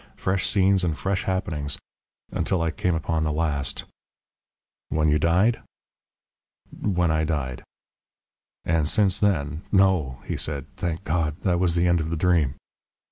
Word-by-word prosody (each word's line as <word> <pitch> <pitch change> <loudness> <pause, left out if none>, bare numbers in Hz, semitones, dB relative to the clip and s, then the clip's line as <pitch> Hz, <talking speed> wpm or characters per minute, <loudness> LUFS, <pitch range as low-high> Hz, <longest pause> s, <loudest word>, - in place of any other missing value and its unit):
Fresh 95 0 0
scenes 95 -1 +3
and 80 -3 0
fresh 95 0 -1
happenings 80 -7 -2 0.5
until 95 - 0
I 80 -1 0
came 90 +1 0
upon 80 0 -1
the 75 - 0
last 75 -3 -1 0.6
" - - -69
"When 75 +2 +2
you 75 +1 +3
died?" 90 +9 +3 1.1
"When 90 -5 0
I 80 0 +1
died." 75 -6 -2 1.0
"And 80 -2 +1
since 100 -4 +2
then 80 -7 +1
" - - -30
"No," 95 - +3
he - - -3
said. 70 -3 -3
"Thank 85 +1 -3
God! 80 -3 0
That 90 -2 +2
was 90 -2 +2
the 85 0 +2
end 85 -1 +3
of 80 - -3
the 85 - -2
dream...." 80 -5 +2
85 Hz, 155 wpm, -25 LUFS, 75-95 Hz, 1.1 s, scenes